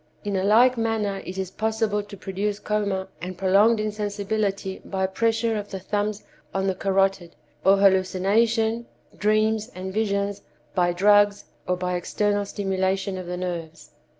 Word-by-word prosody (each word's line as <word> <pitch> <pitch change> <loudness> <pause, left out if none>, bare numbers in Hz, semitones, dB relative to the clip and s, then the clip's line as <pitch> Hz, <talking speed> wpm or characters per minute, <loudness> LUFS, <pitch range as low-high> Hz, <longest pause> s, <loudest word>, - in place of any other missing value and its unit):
In 205 -1 -2
a 190 - 0
like 235 +5 +5
manner 215 -3 -1
it 185 - -6
is 190 -1 -3
possible 220 0 0
to 205 0 -11
produce 195 +2 -2
coma 200 -3 -1
and 180 +1 -6
prolonged 200 +4 +4
insensibility 205 -2 -2
by 190 -1 -1
pressure 225 +3 0
of 205 -1 -4
the 195 - -5
thumbs 205 +2 -2 0.3
on 190 0 0
the 190 - +1
carotid; 195 -2 0 0.3
or 195 +1 +6
hallucination, 210 +4 +2 0.3
dreams 215 +1 +1
and 185 +1 -5
visions 200 -1 -1 0.3
by 175 -1 +2
drugs, 205 +2 +4 0.2
or 180 - +1
by 180 0 -2
external 205 +3 0
stimulation 195 -1 -1
of 185 -1 -6
the 180 0 -4
nerves. 165 -4 -5
200 Hz, 150 wpm, -24 LUFS, 190-215 Hz, 0.3 s, or